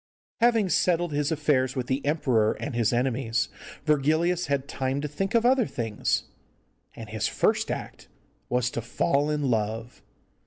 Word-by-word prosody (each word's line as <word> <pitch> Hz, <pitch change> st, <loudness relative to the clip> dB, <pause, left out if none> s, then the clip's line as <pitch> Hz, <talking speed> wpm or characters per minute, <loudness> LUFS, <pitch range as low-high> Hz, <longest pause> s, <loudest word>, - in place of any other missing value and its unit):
Having 230 Hz, -4 st, +3 dB
settled 175 Hz, 0 st, +2 dB
his 145 Hz, +1 st, 0 dB
affairs 140 Hz, -4 st, +1 dB
with 130 Hz, -2 st, -2 dB
the 130 Hz, +2 st, -1 dB
emperor 130 Hz, -8 st, +2 dB
and 145 Hz, -, -5 dB
his 115 Hz, -2 st, +1 dB
enemies, 120 Hz, -2 st, 0 dB, 0.4 s
Virgilius 160 Hz, +4 st, +2 dB
had 140 Hz, -1 st, -1 dB
time 135 Hz, 0 st, -2 dB
to 150 Hz, -, -2 dB
think 195 Hz, +9 st, -3 dB
of 230 Hz, 0 st, +3 dB
other 255 Hz, -2 st, +4 dB
things, 110 Hz, -3 st, -1 dB, 0.7 s
and -, -, -9 dB
his -, -, -1 dB
first -, -, +1 dB
act -, -, -6 dB, 0.4 s
was 125 Hz, 0 st, +1 dB
to 120 Hz, -, -3 dB
fall 140 Hz, +5 st, 0 dB
in 150 Hz, -3 st, 0 dB
love! 110 Hz, +2 st, -2 dB
140 Hz, 155 wpm, -26 LUFS, 120-160 Hz, 0.7 s, other